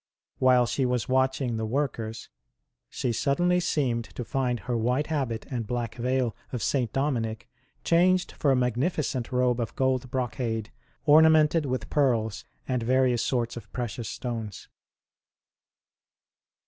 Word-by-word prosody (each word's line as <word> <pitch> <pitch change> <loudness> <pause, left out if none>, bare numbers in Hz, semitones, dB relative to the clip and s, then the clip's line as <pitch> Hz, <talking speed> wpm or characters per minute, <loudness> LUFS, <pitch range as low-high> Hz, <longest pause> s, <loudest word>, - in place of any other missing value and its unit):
While 125 -1 +5
she 135 - -1
was 125 -1 0
watching 130 -2 +1
the 110 - -2
workers, 115 -3 -3 0.6
she 125 - -2
sud 140 +4 0
denly 180 0 +2
seemed 125 -9 0
to 105 +5 -7
find 125 -1 -1
her 125 -1 -2
white 125 +6 +1
habit 120 -7 -2
and 120 -4 -3
black 120 -1 -2
veil 125 0 -1 0.2
of 125 - -3
St. 125 -6 0
Dominic 120 -5 -1 0.4
changed 180 +2 +3
for 145 - 0
a 135 - +5
magnificent 125 +1 -1
robe 125 -1 +2
of 115 - -3
gold 130 -1 0
brocade, 115 -3 -2 0.3
ornamented 155 0 +5
with 125 -3 -3
pearls 115 -7 +1 0.2
and 125 -2 0
various 125 0 +2
sorts 120 -2 -1
of 120 - -10
precious 120 -2 -4
stones. 115 -5 -5
125 Hz, 135 wpm, -27 LUFS, 115-135 Hz, 0.6 s, While